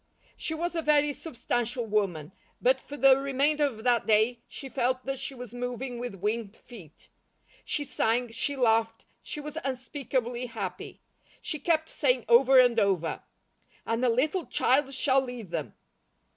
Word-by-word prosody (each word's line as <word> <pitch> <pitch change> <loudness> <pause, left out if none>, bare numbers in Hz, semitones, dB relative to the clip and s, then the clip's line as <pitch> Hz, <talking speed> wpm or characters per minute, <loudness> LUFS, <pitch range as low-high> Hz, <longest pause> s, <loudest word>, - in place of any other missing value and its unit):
She 320 - -4
was 345 +2 -3
a 330 - 0
very 295 -1 +3
substantial 240 -4 -3
woman, 195 -7 -1 0.3
but 260 +1 +3
for 290 - -9
the 270 -1 +6
remainder 280 +2 +1
of 225 -6 -4
that 240 -2 +2
day 220 +3 +3
she 275 - -9
felt 255 -1 -1
that 270 0 -3
she 275 - -5
was 245 -2 -9
moving 245 0 -4
with 245 -4 -5
winged 210 +2 -3
feet. 190 - -15 0.5
She 295 - -2
sang, 245 -3 0
she 285 +5 -2
laughed, 225 -3 +1 0.2
she - - -6
was 300 +2 -6
unspeakably 255 -2 -3
happy. 195 -6 -6 0.4
She 310 -4 -5
kept 315 +1 +1
saying 250 -5 +1
over 255 +3 +6
and 245 -2 +5
over: 190 -6 0 0.6
"And 230 +2 -1
a 250 - +4
little 300 +9 0
child 270 +2 +2
shall 270 0 +3
lead 245 -6 -7
them." 160 -4 -4
250 Hz, 160 wpm, -28 LUFS, 225-275 Hz, 0.6 s, the